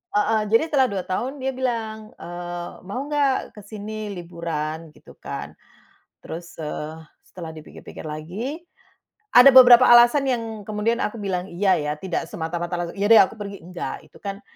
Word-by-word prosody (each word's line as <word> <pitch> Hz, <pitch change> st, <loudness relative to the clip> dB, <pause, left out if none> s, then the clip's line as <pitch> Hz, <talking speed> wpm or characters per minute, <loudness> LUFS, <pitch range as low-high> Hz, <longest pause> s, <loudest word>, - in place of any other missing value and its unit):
heeh. 215 Hz, +1 st, +2 dB
Jadi 230 Hz, -, +5 dB
setelah 265 Hz, -3 st, +4 dB
2 190 Hz, -2 st, -3 dB
tahun, 255 Hz, +9 st, -3 dB
dia 265 Hz, +1 st, -1 dB
bilang. 220 Hz, -4 st, -3 dB
Eee, 175 Hz, 0 st, -6 dB, 0.2 s
"Mau 255 Hz, +8 st, -4 dB
nggak, 285 Hz, -3 st, 0 dB
ke 210 Hz, -, -10 dB
sini, 215 Hz, 0 st, -6 dB
liburan?" 165 Hz, -3 st, -5 dB
Gitu -, -, -16 dB
kan. -, -, -7 dB, 0.7 s
Terus, 170 Hz, +2 st, -8 dB
eee, 155 Hz, +1 st, -5 dB, 0.3 s
setelah 165 Hz, -3 st, -8 dB
dipikir-pikir 155 Hz, +1 st, -11 dB
lagi, 190 Hz, -, -5 dB, 0.7 s
ada 250 Hz, +3 st, +10 dB
beberapa 250 Hz, -1 st, +9 dB
alasan 240 Hz, +4 st, +7 dB
yang 225 Hz, -4 st, -3 dB
kemudian 215 Hz, +3 st, 0 dB
aku 225 Hz, +2 st, -3 dB
bilang 185 Hz, -2 st, -2 dB
"iya", 190 Hz, +2 st, +2 dB
ya. 150 Hz, 0 st, -2 dB
Tidak 175 Hz, -2 st, -3 dB
semata-mata 170 Hz, +2 st, -4 dB
langsung, 175 Hz, +3 st, -7 dB
"Iya 205 Hz, -, +1 dB
deh, 225 Hz, -, +9 dB
aku 220 Hz, -, -3 dB
pergi," 200 Hz, -3 st, -7 dB
enggak. 180 Hz, 0 st, -6 dB
Itu -, -, -17 dB
kan, 200 Hz, 0 st, -5 dB
205 Hz, 160 wpm, -23 LUFS, 175-235 Hz, 0.7 s, ada